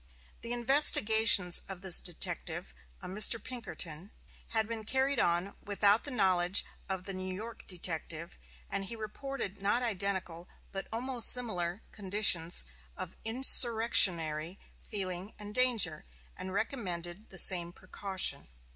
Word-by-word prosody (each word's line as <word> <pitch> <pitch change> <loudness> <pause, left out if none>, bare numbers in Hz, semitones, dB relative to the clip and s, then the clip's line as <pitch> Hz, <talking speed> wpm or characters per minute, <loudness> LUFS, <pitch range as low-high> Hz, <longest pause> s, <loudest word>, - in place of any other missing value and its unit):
The 235 - -5
investigations 225 - +4
of 190 -2 -9
this 190 -3 +4
detective, 155 - -2 0.3
a - - -7
Mr. 210 +5 +4
Pinkerton, 200 -8 -7 0.4
had 220 -1 +1
been 225 -1 -7
carried 265 +5 -1
on 175 +3 +1
without 205 +1 +1
the - - -3
knowledge 190 -6 +1 0.2
of 190 -1 -5
the 195 - -6
New 185 0 -6
York 220 +5 -8
detective, 170 -1 -2 0.3
and 200 0 -3
he 230 - -8
reported 215 -2 -8
not 205 +5 +1
identical, 190 -5 -4 0.2
but 195 -1 -7
almost 240 +1 0
similar, 190 -6 0
conditions 190 -4 +3 0.3
of - - -9
insurrectionary 210 - +3 0.2
feeling 190 -1 -5
and 210 0 -10
danger, 225 -10 +1 0.3
and 185 - -9
recommended 190 -3 -6
the 190 - -10
same 175 -2 +5
precaution. 190 +1 -3
200 Hz, 125 wpm, -30 LUFS, 180-225 Hz, 0.4 s, same